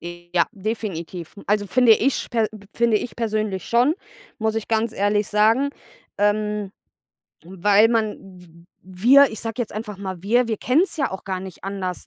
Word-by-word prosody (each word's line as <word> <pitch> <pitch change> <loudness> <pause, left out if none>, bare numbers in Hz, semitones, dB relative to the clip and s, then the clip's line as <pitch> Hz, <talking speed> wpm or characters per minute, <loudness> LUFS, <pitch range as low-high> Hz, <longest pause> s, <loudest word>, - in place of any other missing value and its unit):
Ja, 175 0 -1
definitiv. 190 -5 -5
Also, 205 0 +1
finde 250 +2 +3
ich 250 +5 +3
per 230 -2 +1
p 210 -2 -13
finde 235 -2 +2
ich 245 - -7
persönlich 215 -4 -2
schon, 245 +6 +3 0.4
muss 220 -1 0
ich 225 - -4
ganz 225 0 0
ehrlich 205 +1 +1
sagen, 225 +7 +3 0.5
ähm, 210 -1 0 0.7
weil 200 +4 +3
man 225 -2 0
w 180 -3 -16 0.2
wir, 240 +10 +5
ich 220 - -6
sage 225 -1 -5
jetzt 230 - -4
einfach 210 -2 -6
mal 190 -3 -6
wir, 235 +4 +2
wir 220 - -1
kennen 255 +10 +2
es - - -7
ja 275 - 0
auch 190 - -7
gar 190 -1 -3
nicht 190 0 -10
anders, 190 -2 -4
210 Hz, 175 wpm, -22 LUFS, 190-225 Hz, 0.7 s, wir